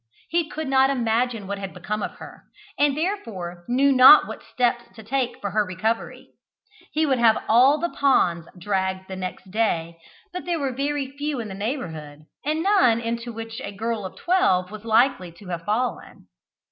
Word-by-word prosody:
He 335 -2 0
could 315 -1 -5
not 265 0 +4
imagine 235 -3 0
what 200 +1 -4
had 195 -1 -7
become 210 +4 -4
of - - -4
her, - - -12 0.3
and 290 -1 +2
therefore 200 - -4
knew 270 +3 +3
not 265 +3 +9
what - - -8
steps 240 -1 0
to 220 - -11
take 255 +2 -2
for 200 - -4
her 215 +1 +2
recovery. 205 +5 -3 0.6
He 315 +1 +1
would 265 -4 +1
have 225 -2 +4
all 255 +6 +5
the 345 +3 -2
ponds 175 - +2
dragged 190 0 -2
next 185 0 -7
day, 170 -6 -1 0.3
but 360 - -6
there 350 -1 -1
were 275 -4 -2
very 275 0 -3
few 290 -1 -3
in 220 -2 -5
the - - -6
neighbourhood, 165 - -5 0.2
and 310 +3 -1
none 265 - +4
into 235 +1 -4
which 225 +2 -7
a - - -5
girl 220 +1 -3
of 190 - -7
twelve 195 - +1
was 215 0 -9
likely 225 -5 +2
to 180 +2 -13
have 170 -1 -5
fallen. 235 +4 -3
230 Hz, 180 wpm, -23 LUFS, 195-275 Hz, 0.6 s, not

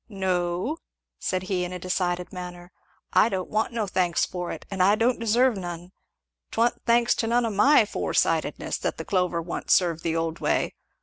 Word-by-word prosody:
"No," 185 - -1 0.4
said 185 0 -1
he 185 -2 -1
in 180 - -4
a 180 - -4
decided 180 0 -2
manner, 180 -1 -8 0.4
"I 225 - +5
don't 185 -3 -3
want 215 +2 0
no 230 -2 -1
thanks 180 -3 +1
for 180 -1 -5
it, - - -7
and 190 -1 -1
I 200 +3 +5
don't 235 +3 +1
deserve 235 +2 +3
none! 175 -1 -6 0.6
'Twa'n't 235 +1 +1
thanks 235 0 +4
to 225 - 0
none 240 +1 +2
of 225 - -2
my 230 +4 +5
fore - - -3
sightedness - - 0
that - - -2
the - - -6
clover 180 -4 0
wa'n't 170 - -6
served 170 -3 +3
the 165 -1 -1
old 165 0 -2
way. - - 0
185 Hz, 190 wpm, -25 LUFS, 175-225 Hz, 0.6 s, I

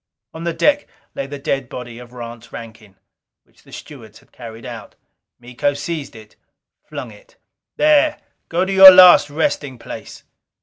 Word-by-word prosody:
On 165 +1 -8
the 170 - -1
deck 290 - +1 0.3
lay 135 - -5
the 145 +1 -8
dead 135 -2 -3
body 120 -1 -9
of 120 -1 -14
Rance 120 -1 -11
Rankin, 110 -3 -12 0.5
which - - -29
the - - -21
stewards 110 -7 -12
had - - -24
carried 115 0 -12
out. 115 -4 -10 0.4
Miko 125 +3 -3
seized 150 -2 -6
it: 110 -1 -15 0.5
flung - - -9
it. - - -20 0.4
"There! 300 0 +2 0.3
Go 175 +2 0
to 195 - -3
your 190 0 +11
last 180 -5 +7
resting 145 -3 -3
place!" - - -11
135 Hz, 160 wpm, -18 LUFS, 120-170 Hz, 0.5 s, your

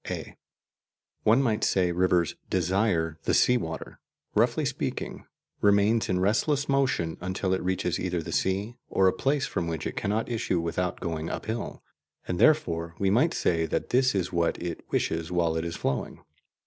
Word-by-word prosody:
(a) - - -5 0.9
One 115 +6 +4
might 110 -4 0
say 90 -2 +2
rivers 90 -1 +2 0.2
"desire" 90 -3 +1
the - - +2
sea 125 - +5
water, 80 -9 -4 0.3
roughly - - +2
speaking, - - -4 0.3
remains 105 +2 +3
in 90 -1 +1
restless 135 +9 +1
motion 130 -12 +1
until 95 +1 -1
it 95 - 0
reaches 90 -1 -1
either 90 -2 -2
the - - -6
sea 100 +5 -1
or 95 - +3
a 95 - +3
place 135 +7 0
from 85 - -2
which 80 -2 -3
it - - -3
cannot 105 +3 -1
issue 110 -7 -1
without 85 +2 -2
going 80 -2 -3
uphill, 110 +1 -4 0.4
and 90 - -2
therefore 85 - +2
we 95 -1 +1
might 150 +11 +3
say 80 -1 +1
that - - -2
this 130 -2 +3
is 90 -2 -1
what 85 -1 +1
it 85 -1 -4
wishes 80 +1 -1
while 85 -2 +1
it 80 - -1
is 85 0 -4
flowing. 65 - -3
95 Hz, 170 wpm, -27 LUFS, 85-110 Hz, 0.9 s, sea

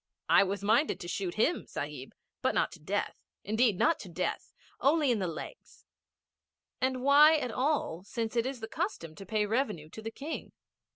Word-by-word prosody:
I - - +7
was 200 +1 -3
minded 230 +9 +2
to 175 - -6
shoot 180 0 -3
him, 290 +11 +1
Sahib. 145 -2 -6 0.3
But - - +1
not - - +2
to - - -12
death. - - -2 0.3
Indeed 220 -1 +2
not 325 - +3
to 190 - -9
death. 180 +2 -3 0.3
Only 290 -1 +3
in 230 - +1
the 185 - -1
legs.' 170 - -9 1.0
'And 255 -1 0
why 295 +3 +7
at 250 -5 -2
all, 255 - 0
since 225 +2 -4
it 235 +1 +2
is 260 -3 -5
the 225 - -4
custom 320 - -3
to 195 +2 -11
pay 215 0 +1
revenue 205 - -1
to 220 - -9
the 225 - -4
King? 285 +7 -6
225 Hz, 185 wpm, -30 LUFS, 195-280 Hz, 1.0 s, I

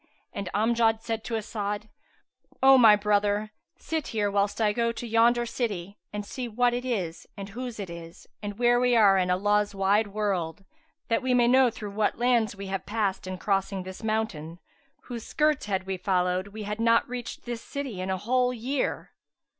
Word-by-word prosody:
and 200 -2 -4
Amjad 225 +1 +2
said 225 -1 -3
to 230 - -2
As'ad, 210 -1 -3 0.8
"O 270 0 +9
my 225 -5 +8
brother, 210 0 +1 0.3
sit 320 -2 -3
here, 205 -2 -1
whilst 200 +1 0
I 210 -2 +2
go 235 +1 +1
to 235 - -6
yonder 235 +1 +3
city 205 -5 -4
and 210 0 -5
see 250 +3 -5
what 240 +2 +1
it 245 +1 -2
is 190 -10 -3
and 200 0 -6
whose 245 +1 -6
it 200 - -4
is 170 -1 -10 0.2
and 205 -1 -5
where 240 0 +4
we 245 -1 +3
are 200 -4 +6
in 180 0 0
Allah's 205 +2 +1
wide 200 +2 +2
world, 200 -3 -2 0.4
that 230 - +2
we 255 -1 +1
may 240 -1 +4
know 255 0 +5
through 210 -2 -7
what 210 +1 0
lands 235 -3 +2
we 200 0 -7
have 195 -1 -4
passed 205 -3 -1
in 185 0 -4
crossing 195 0 -1
this 185 +3 -9
mountain, 215 -8 -2 0.4
whose 235 -3 -7
skirts 305 -6 +1
had 190 -2 -1
we 190 0 -3
followed, 180 0 0
we 215 +1 -8
had 210 +1 -4
not 230 0 +3
reached 245 -1 -6
this 240 -1 -4
city 265 -10 -5
in 185 - -3
a 190 - 0
whole 250 +5 +1
year. 250 +3 -2
210 Hz, 190 wpm, -27 LUFS, 195-235 Hz, 0.8 s, O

